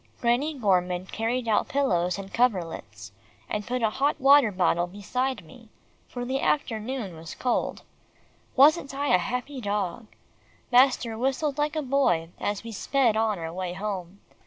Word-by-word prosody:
Granny 255 +6 +1
Gorman 185 -5 +1
carried 230 +4 -2
out 215 - +2
pillows 180 -11 +1
and 195 0 -8
coverlets, 165 - -1 0.4
and 210 0 -4
put 250 0 -2
a 220 - +2
hot 275 +5 0
water 275 -4 +6
bottle 175 -2 +1
beside 205 +3 -3
me, 225 +7 -16 0.4
for 245 -1 -5
the 265 +2 -1
afternoon 230 - -1
was 160 0 -9
cold. 250 - -1 0.7
Wasn't 280 0 +4
I 285 +1 -1
a 180 - +6
happy 250 +6 -4
dog! 205 +1 -2 0.6
Master 250 -2 +4
whistled 275 +3 -1
like 300 +1 0
a 310 - -1
boy, 250 -12 +1
as 205 0 -2
we 230 - -7
sped 240 +1 +1
on 220 -2 +1
our 165 -1 -5
way 180 -1 -4
home. 190 -1 -5
225 Hz, 155 wpm, -26 LUFS, 185-265 Hz, 0.7 s, water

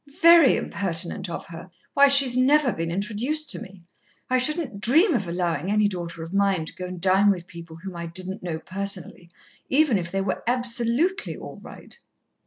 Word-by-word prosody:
"Very 335 -4 +7
impertinent 185 0 -2
of 170 - -6
her! 170 +2 -10 0.2
Why, 280 0 +6
she's 275 -3 +5
never 265 0 +3
been 165 0 -4
introduced 235 - -2
to - - -1
me. 190 -5 -12 0.5
I 255 - +3
shouldn't 255 - -1
dream 325 - +4
of 200 -8 -1
allowin' 170 -1 -2
any 210 0 +3
daughter 170 -4 -6
of 165 +3 -9
mine 195 -4 +1
to - - -9
go 185 - -7
and 180 -1 -8
dine 190 +3 +3
with 180 -4 -1
people 170 -1 -11
whom 180 +2 -9
I 170 0 -6
didn't 185 +3 -6
know 170 -3 -4
personally, 185 -1 -4 0.4
even 270 -7 +3
if 170 -1 -5
they 195 - -1
were 190 -1 -3
absolutely 250 - +1
all - - -10
right." - - -12
200 Hz, 185 wpm, -24 LUFS, 175-255 Hz, 0.5 s, Very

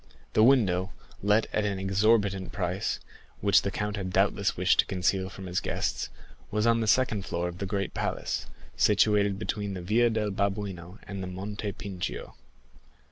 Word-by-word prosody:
The - - +4
window, 100 -7 +4 0.3
let 105 +2 +3
at 105 - +1
an 100 -2 -1
exorbitant 95 0 +2
price, 90 0 -2 0.4
which - - +5
the - - -1
count 105 0 -3
had 95 -2 -3
doubtless - - +2
wished - - +3
to - - +6
conceal 95 +1 0
from 95 0 -9
his 90 0 -1
guests, - - -2 0.4
was 105 +1 0
on 115 0 +4
the 110 - -1
second 110 -4 +2
floor 85 -1 -2
of 90 +1 -7
the 100 - -2
great 100 0 -2
palace, - - -2 0.3
situated 100 -2 +3
between 100 +1 -3
the 90 - -5
Via 115 +6 +3
del 110 -2 -1
Babuino 100 -2 -3
and 100 -1 -6
the 95 - -4
Monte 100 +3 -4
Pincio. 95 -3 -5
100 Hz, 170 wpm, -28 LUFS, 95-105 Hz, 0.4 s, to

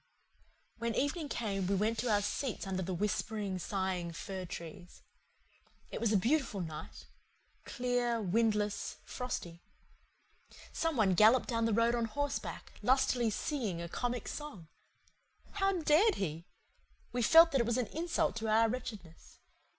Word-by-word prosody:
When 230 0 -1
evening 290 +2 -1
came 200 -7 -2
we 200 - +1
went 220 +3 0
to 245 - -1
our 205 -1 +3
seats 245 +2 -2
under 190 -1 -2
the 185 +1 -3
whispering, 205 0 -2
sighing 185 -3 -2
fir 190 +2 -5
trees. 175 +1 -9 0.9
It - - -5
was 230 -2 +2
a 210 - +5
beautiful 235 0 +1
night 160 -4 -7 0.6
clear, 245 -2 0
windless, 210 +1 0
frosty. 175 -9 -5 1.1
Some 325 -4 -1
one 200 -4 +4
galloped 220 +7 +5
down 230 -2 +1
the 225 - +1
road 230 +2 +3
on 235 -1 +1
horseback, 285 +5 -4
lustily 255 -2 +3
singing 220 - -2
a 170 - -4
comic 245 +5 -3
song. 275 - -7 0.8
How 390 -1 +1
dared 360 +9 +5
he? 165 -2 -4 0.6
We 245 - -1
felt 330 +8 +8
that 270 - +3
it 235 - -1
was 235 +1 +1
an 250 - +1
insult 330 +8 -1
to 225 -1 -3
our 220 +1 +4
wretchedness. 215 -9 -7
225 Hz, 145 wpm, -33 LUFS, 190-250 Hz, 1.1 s, felt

